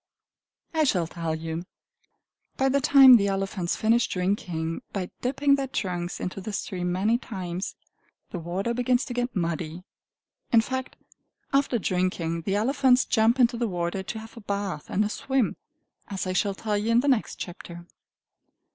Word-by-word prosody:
I 315 -1 +3
shall 185 - +2
tell 165 -1 -3
you. 160 +1 -4 0.9
By 270 0 +2
the 280 +1 +2
time 265 -2 +9
the 200 -2 +1
elephants 195 -2 -1
finish 230 +1 +2
drinking 180 -4 -2
by 185 -3 -4
dipping 280 +3 +2
their 275 -1 +1
trunks 180 -8 -3
into 185 +2 -4
the 215 - -5
stream 180 -3 -3
many 210 +6 +2
times, 185 -6 -5 0.6
the 180 - -4
water 185 +7 -2
begins 250 +1 +1
to 250 - -5
get 245 0 -2
muddy. 170 -1 -2 0.7
In 230 -3 +6
fact, 260 +2 -4 0.6
after 275 -3 +2
drinking, 180 -4 -1
the 195 - +1
elephants 255 +3 +3
jump 230 +2 +3
into 240 -1 +4
the 235 0 0
water 175 0 -2
to 205 +4 -5
have 220 0 -10
a 230 - -10
bath 200 -6 -3
and 210 +2 +1
a - - +1
swim, 265 0 0 0.5
as 195 -2 -4
I 185 - -2
shall 200 +1 +1
tell 215 +1 -2
you 215 +2 -2
in 230 +1 +5
the 285 - -2
next 255 -6 +1
chapter. 175 -1 -8
200 Hz, 165 wpm, -26 LUFS, 180-245 Hz, 0.9 s, time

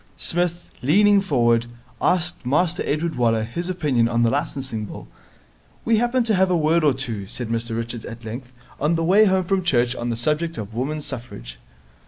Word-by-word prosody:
Psmith, 175 0 -1
leaning 200 - +4
forward, 120 -9 +2 0.3
asked 175 -3 +1
Master 160 +7 +1
Edward 160 +3 -1
Waller 115 -2 +1
his 170 +11 -4
opinion 145 -10 +1
on 120 0 +1
the 115 - +3
Licensing 135 -6 -2
Bill. - - -9 0.8
'We 225 -1 +3
happened 240 +2 +1
to 225 - +1
have 190 -1 +3
a 180 - +2
word 160 +1 +2
or 145 -3 +4
two,' 115 -7 -4
said 120 +1 -4
Mr 115 0 -2
Richards 115 0 -5
at 115 -1 -9
length, 120 +3 -7 0.3
'on 150 +4 +1
the 165 - 0
way 195 +6 +5
home 190 -2 +2
from 190 +2 0
church 125 -7 +2
on 120 -1 -3
the 115 - -1
subject 155 +7 -1
of 105 0 -6
Women's 145 +6 -3
Suffrage.' - - -7
140 Hz, 190 wpm, -22 LUFS, 115-175 Hz, 0.8 s, way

